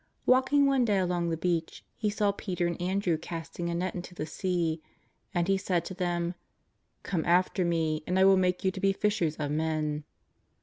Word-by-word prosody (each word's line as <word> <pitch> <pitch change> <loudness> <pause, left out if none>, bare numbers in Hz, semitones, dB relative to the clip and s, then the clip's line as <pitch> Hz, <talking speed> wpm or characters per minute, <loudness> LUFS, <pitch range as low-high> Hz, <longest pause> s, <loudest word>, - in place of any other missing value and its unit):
Walking 260 +3 +4
one 270 -2 +3
day 210 -4 +2
along 175 -2 0
the 165 - -1
beach, 165 -1 -2
He 215 - -1
saw 205 0 +1
Peter 185 -3 -3
and 170 0 -2
Andrew 180 -2 0
casting 170 +1 -5
a 170 - -1
net 180 +2 -1
into 180 0 -7
the 155 - -3
sea. 165 -1 -1 0.5
And 175 -1 0
He 195 0 +2
said 180 -3 0
to - - -5
them: 175 -1 -1 0.7
^' - - -43
Come 170 -4 -1
after 180 +2 +2
Me 160 -2 0
and 180 - +1
I 190 - +6
will 195 0 +7
make 180 -1 +1
you 190 - +2
to 190 - -7
be 195 0 +3
fishers 195 -7 0
of 145 -2 -3
men." 155 -1 -1
180 Hz, 205 wpm, -29 LUFS, 165-190 Hz, 0.7 s, will